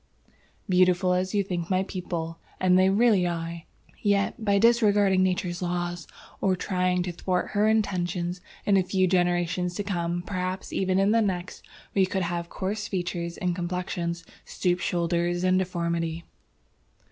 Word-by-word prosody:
"Beautiful 185 0 +3
as 185 +2 -1
you 200 - +3
think 175 -3 -4
my 185 0 +2
people, 170 -3 -5 0.2
and 185 -1 +3
as - - +6
they 185 +1 +5
really 200 -3 +4
are, 170 0 -4 0.4
yet, 200 +1 +1
by 200 -2 +3
disregarding 205 -4 +4
nature's 180 -1 0
laws, 175 -1 -3 0.3
or 190 -1 +2
trying 180 -1 0
to 180 - -3
thwart 180 +1 -1
her 210 +1 +2
intentions, 180 -4 0 0.2
in 200 -1 +4
a 190 - +3
few 185 +1 +1
generations 175 -1 +1
to 205 - -2
come, 175 -3 -2
perhaps 185 0 -4
even 190 -1 +1
in 195 +2 +3
the 230 +1 +4
next, 185 -3 -2 0.3
we 190 -2 +3
could 190 -1 -1
have 170 0 -3
coarse 205 +2 -3
features 175 -2 -3
and 180 -1 -1
complexions, 175 -1 -3 0.2
stoop 180 -1 -1
shoulders 175 0 0
and 185 0 +3
deformity. 170 -2 -2
180 Hz, 155 wpm, -26 LUFS, 175-195 Hz, 0.4 s, as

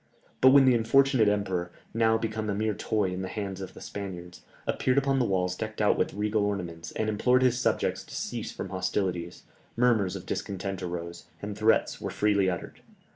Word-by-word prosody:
But 130 - +8
when 135 0 +7
the 130 - +6
unfortunate 125 0 +4
emperor, 95 -4 -1 0.2
now 110 0 +3
become 110 -1 -3
a 100 - 0
mere 110 +1 0
toy 100 -1 -1
in 90 - -4
the 95 - -3
hands 100 -1 -5
of 95 - -8
the - - -11
Spaniards, 90 -3 -7 0.2
appeared 130 +1 +1
upon 135 -1 +2
the 125 - +2
walls 90 -3 0
decked 110 +2 -5
out 105 - +4
with - - -1
regal 105 0 0
ornaments, 90 -5 -3
and 110 - -1
implored 125 +4 +3
his 125 -1 +3
subjects - - 0
to - - -10
cease - - -4
from - - -6
hostilities, 90 -2 -2 0.3
murmurs 115 -6 +2
of - - -7
discontent 95 -1 -4
arose, 85 -1 -5
and 105 0 -5
threats 110 +2 +2
were - - -3
freely 100 -2 +2
uttered. 90 - -5
105 Hz, 190 wpm, -28 LUFS, 95-110 Hz, 0.3 s, But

